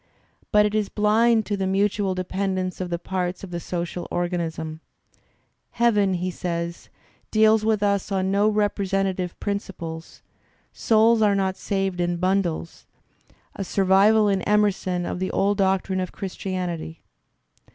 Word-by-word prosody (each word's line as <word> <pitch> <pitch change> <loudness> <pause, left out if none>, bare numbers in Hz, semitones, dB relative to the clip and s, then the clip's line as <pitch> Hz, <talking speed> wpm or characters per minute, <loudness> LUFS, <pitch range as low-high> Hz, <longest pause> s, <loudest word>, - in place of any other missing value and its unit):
| - - -37
But 210 -1 +5
it 210 - -1
is 215 -2 0
blind 220 +1 +3
to 205 - -1
the 195 -1 -2
mutual 195 0 +1
dependence 185 0 -2
of 180 - -3
the 170 - -1
parts 180 +1 -3
of 190 - -8
the 175 - -3
social 175 0 -4
organism. 165 -3 -3 0.9
"Heaven," 210 -5 +2
he 180 +1 -2
says, 170 -1 -4 0.2
"" - - -37
deals 215 0 +4
with 215 -1 +1
us 200 0 0
on 190 -1 0
no 205 +2 +3
representative 195 -3 -1
principles; 175 -5 -5 0.5
souls 225 0 +3
are 205 -2 +4
not 190 -1 0
saved 195 -3 -2
in 175 0 0
bundles" 185 -2 -1 0.3
— - - -38 0.3
a 195 - -3
survival 195 +3 +4
in 195 -2 +1
Emerson 195 -4 +1
of - - -4
the 185 - -1
old 200 +1 +1
doctrine 190 0 +1
of 185 -1 -3
Christianity. 180 -4 -5
190 Hz, 150 wpm, -24 LUFS, 180-205 Hz, 0.9 s, But